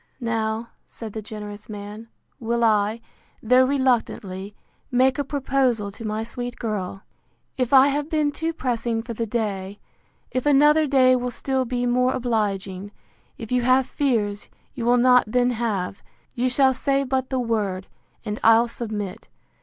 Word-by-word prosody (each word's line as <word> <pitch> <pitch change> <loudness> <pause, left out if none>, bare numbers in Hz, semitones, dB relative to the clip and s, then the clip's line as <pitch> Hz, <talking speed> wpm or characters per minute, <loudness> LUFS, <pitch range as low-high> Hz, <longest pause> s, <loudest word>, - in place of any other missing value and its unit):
Now, 225 -1 -2 0.2
said 220 -3 -9
the 220 - -4
generous 210 0 -9
man, 210 +2 -8 0.3
will 235 -1 -1
I, 215 0 +2 0.4
though 250 +3 +5
reluctantly, 220 -7 -1 0.3
make 260 +2 +2
a - - +1
proposal 265 -6 0
to 220 - -10
my 215 +1 -2
sweet 245 +1 -5
girl.—If 215 +4 -6
I 270 -1 +8
have 290 +2 -2
been 305 -3 +1
too 325 +3 -2
pressing 235 -6 -2
for 235 0 -6
the 230 +1 -3
day: 205 -3 -3 0.5
If 255 +2 -1
another 295 +2 +5
day 260 -2 +5
will 250 0 -1
still 265 +1 -1
be 245 0 -2
more 250 +1 +2
obliging: 205 -5 -2 0.5
If 225 0 -8
you 250 0 +2
have 255 +2 +3
fears 220 -8 -1 0.2
you 230 - -4
will 245 +1 +4
not 250 0 +5
then 245 +3 +2
have; 215 -6 -2 0.3
you 255 0 0
shall 265 +1 +4
say 275 +1 0
but 260 -1 -1
the 260 - -1
word, 210 -6 -1 0.4
and 210 -1 -3
I'll 225 +1 +6
submit. 215 -5 -5
235 Hz, 155 wpm, -23 LUFS, 215-255 Hz, 0.5 s, I